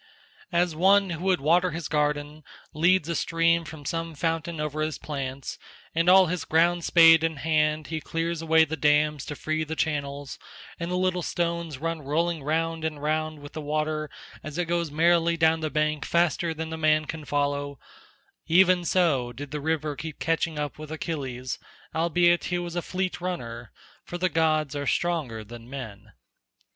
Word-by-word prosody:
As 175 Hz, -2 st, +1 dB
one 195 Hz, +3 st, +4 dB
who 170 Hz, +2 st, -4 dB
would 185 Hz, -2 st, +3 dB
water 175 Hz, +5 st, +3 dB
his 165 Hz, -2 st, -5 dB
garden 150 Hz, 0 st, -1 dB, 0.3 s
leads 170 Hz, +2 st, +3 dB
a 170 Hz, -, -1 dB
stream 165 Hz, 0 st, +2 dB
from 150 Hz, -2 st, -10 dB
some 165 Hz, +1 st, -3 dB
fountain 165 Hz, 0 st, -2 dB
over 150 Hz, 0 st, -2 dB
his 155 Hz, -2 st, -1 dB
plants, 135 Hz, -2 st, -5 dB, 0.3 s
and 165 Hz, +2 st, +2 dB
all 190 Hz, 0 st, +8 dB
his 180 Hz, 0 st, -2 dB
ground—spade 165 Hz, 0 st, +5 dB
in 165 Hz, -1 st, 0 dB
hand 155 Hz, 0 st, +1 dB
he 160 Hz, -1 st, -4 dB
clears 165 Hz, +1 st, -2 dB
away 160 Hz, 0 st, +4 dB
the 160 Hz, +1 st, -4 dB
dams 150 Hz, -1 st, +2 dB
to 150 Hz, -, -5 dB
free 155 Hz, +1 st, -2 dB
the 160 Hz, +1 st, -5 dB
channels, 145 Hz, -3 st, -3 dB, 0.4 s
and 170 Hz, 0 st, -3 dB
the 180 Hz, -, -1 dB
little 180 Hz, 0 st, +1 dB
stones 170 Hz, -3 st, -2 dB
run 165 Hz, +2 st, -3 dB
rolling 160 Hz, +3 st, -1 dB
round 165 Hz, +2 st, -1 dB
and 155 Hz, -2 st, -3 dB
round 155 Hz, 0 st, -1 dB
with 145 Hz, -, -11 dB
the 155 Hz, -, -5 dB
water 155 Hz, +1 st, -2 dB, 0.3 s
as 155 Hz, +1 st, -7 dB
it 175 Hz, -, 0 dB
goes 170 Hz, -1 st, -1 dB
merrily 170 Hz, +2 st, +3 dB
down 160 Hz, 0 st, +3 dB
the 155 Hz, -1 st, -2 dB
bank 150 Hz, -1 st, 0 dB
faster 170 Hz, 0 st, +1 dB
than 160 Hz, 0 st, -5 dB
the 160 Hz, -, -4 dB
man 155 Hz, -1 st, +3 dB
can 160 Hz, 0 st, -6 dB
follow—even 145 Hz, +5 st, 0 dB
so 155 Hz, -9 st, +2 dB
did 135 Hz, +3 st, -8 dB
the 150 Hz, -1 st, -4 dB
river 155 Hz, -1 st, -1 dB
keep 155 Hz, 0 st, -7 dB
catching 165 Hz, -1 st, -1 dB
up 150 Hz, 0 st, -4 dB
with 155 Hz, 0 st, -8 dB
Achilles 135 Hz, -6 st, -4 dB, 0.3 s
albeit 175 Hz, +1 st, +3 dB
he 180 Hz, -, -1 dB
was 175 Hz, -1 st, -5 dB
a 175 Hz, -, 0 dB
fleet 185 Hz, 0 st, -3 dB
runner, 120 Hz, -, -5 dB, 0.3 s
for 175 Hz, -, -6 dB
the 185 Hz, +1 st, +1 dB
gods 155 Hz, -3 st, +1 dB
are 145 Hz, -1 st, -3 dB
stronger 150 Hz, -11 st, -1 dB
than 115 Hz, +2 st, -11 dB
men. 110 Hz, -6 st, -8 dB
160 Hz, 175 wpm, -26 LUFS, 150-170 Hz, 0.4 s, all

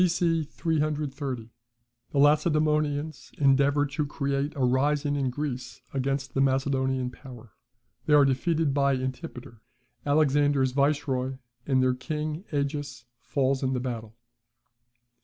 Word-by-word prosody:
B.C. 170 Hz, -2 st, +1 dB
330. 145 Hz, -7 st, -2 dB, 0.6 s
The -, -, -4 dB
Lacedaemonians 150 Hz, 0 st, +2 dB
endeavour 140 Hz, +1 st, +3 dB
to 145 Hz, +2 st, -2 dB
create 140 Hz, -1 st, -2 dB
a 140 Hz, -, -3 dB
rising 145 Hz, +3 st, +1 dB
in 135 Hz, -2 st, 0 dB
Greece 130 Hz, -1 st, -5 dB
against 135 Hz, 0 st, -2 dB
the 135 Hz, -, +1 dB
Macedonian 130 Hz, -1 st, +1 dB
power; 125 Hz, -3 st, -12 dB, 0.6 s
they 150 Hz, -, +5 dB
are 145 Hz, -1 st, +7 dB
defeated 150 Hz, +2 st, +1 dB
by 140 Hz, -1 st, +2 dB
Antipater, 130 Hz, -2 st, -6 dB, 0.4 s
Alexander's 145 Hz, -2 st, +3 dB
viceroy; 135 Hz, -2 st, 0 dB, 0.3 s
and 130 Hz, -2 st, +3 dB
their 130 Hz, 0 st, +3 dB
king, 150 Hz, +6 st, -4 dB
Agis, 145 Hz, -3 st, -3 dB
falls 135 Hz, -1 st, 0 dB
in 130 Hz, -1 st, 0 dB
the 125 Hz, -, 0 dB
battle. 115 Hz, -3 st, -5 dB
140 Hz, 120 wpm, -27 LUFS, 130-150 Hz, 0.6 s, are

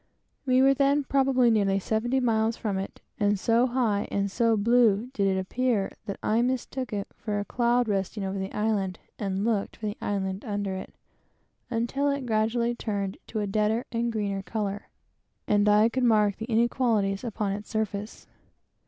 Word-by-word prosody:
We 255 Hz, 0 st, +4 dB
were 270 Hz, 0 st, +6 dB
then 280 Hz, +1 st, +2 dB
probably 265 Hz, -3 st, +3 dB
nearly 200 Hz, -3 st, +2 dB
seventy 225 Hz, +6 st, 0 dB
miles 225 Hz, -2 st, +1 dB
from 205 Hz, -4 st, -2 dB
it; 195 Hz, -, -7 dB, 0.2 s
and 205 Hz, -1 st, +2 dB
so 230 Hz, +5 st, +3 dB
high 235 Hz, -5 st, 0 dB
and 200 Hz, 0 st, -1 dB
so 230 Hz, +1 st, +2 dB
blue 230 Hz, +1 st, +3 dB
did 200 Hz, -6 st, +1 dB
it 190 Hz, -1 st, +1 dB
appear, 220 Hz, +1 st, 0 dB, 0.2 s
that 200 Hz, -, -4 dB
I 220 Hz, +2 st, +2 dB
mistook 255 Hz, 0 st, -2 dB
it 200 Hz, -2 st, -3 dB
for 205 Hz, -1 st, -3 dB
a 205 Hz, -, -3 dB
cloud, 240 Hz, +1 st, +1 dB
resting 200 Hz, 0 st, -1 dB
over 195 Hz, +1 st, -3 dB
the 190 Hz, +1 st, -4 dB
island, 205 Hz, -4 st, -1 dB, 0.2 s
and 195 Hz, 0 st, -1 dB
looked 220 Hz, -4 st, 0 dB
for 215 Hz, -, -6 dB
the 205 Hz, 0 st, -3 dB
island 190 Hz, -1 st, -2 dB
under 205 Hz, -2 st, -2 dB
it, 190 Hz, -, -7 dB, 0.7 s
until 250 Hz, +4 st, 0 dB
it 280 Hz, -2 st, -2 dB
gradually 235 Hz, +1 st, +1 dB
turned 200 Hz, -4 st, -3 dB
to 220 Hz, -, -3 dB
a -, -, -1 dB
deader 215 Hz, +4 st, 0 dB
and 235 Hz, 0 st, -1 dB
greener 200 Hz, -3 st, -2 dB
color, 205 Hz, 0 st, -4 dB, 0.6 s
and 205 Hz, 0 st, +3 dB
I 210 Hz, +1 st, +5 dB
could 255 Hz, +2 st, -1 dB
mark 210 Hz, -4 st, +3 dB
the 225 Hz, -, -5 dB
inequalities 225 Hz, -3 st, +1 dB
upon 215 Hz, -4 st, -2 dB
its 205 Hz, +1 st, -5 dB
surface. 210 Hz, -1 st, -3 dB
215 Hz, 175 wpm, -27 LUFS, 200-240 Hz, 0.7 s, were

